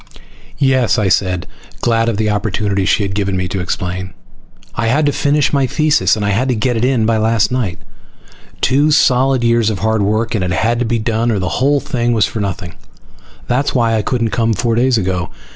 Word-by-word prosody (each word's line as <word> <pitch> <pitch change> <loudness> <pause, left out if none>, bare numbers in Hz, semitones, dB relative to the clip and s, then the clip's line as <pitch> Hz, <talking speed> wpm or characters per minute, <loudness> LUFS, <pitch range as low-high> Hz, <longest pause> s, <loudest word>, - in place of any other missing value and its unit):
"Yes," 130 -4 +2
I 105 -3 +1
said, 90 -2 0 0.4
glad 115 -1 +1
of 110 - -2
the 110 0 0
opportunity 105 -1 -1
she 100 +2 +2
had 100 -1 -3
given 100 -2 -1
me 90 0 -2
to 95 - -3
explain. 95 +1 -4 0.6
"I 115 +2 -2
had 145 +6 +2
to 145 - +2
finish 145 +1 +1
my 140 -2 +2
thesis 155 +1 +2
and 110 +4 0
get 125 +2 0
it 115 - -1
in 125 -3 +2
by 115 0 +1
last 110 0 +1
night. 115 -9 -2 0.8
Two 140 +4 +2
solid 130 -3 +3
years 115 -2 +2
of 105 - -2
hard 110 +2 0
work 110 +3 0
and 105 -5 -1
it 90 -1 -1
had 115 +5 0
to 125 - 0
be 115 +1 0
done 115 +1 -1
or 110 - 0
the 95 -1 -2
whole 140 +2 +3
thing 120 -2 -1
was 110 -5 +3
for 110 - -5
nothing. 90 -3 -4 0.7
That's 130 +4 0
why 115 -2 +2
I 110 - +1
couldn't 115 0 -1
come 115 -1 +1
four 115 +3 -1
days 125 +1 +2
ago. 90 -3 -2
115 Hz, 205 wpm, -16 LUFS, 100-125 Hz, 0.8 s, solid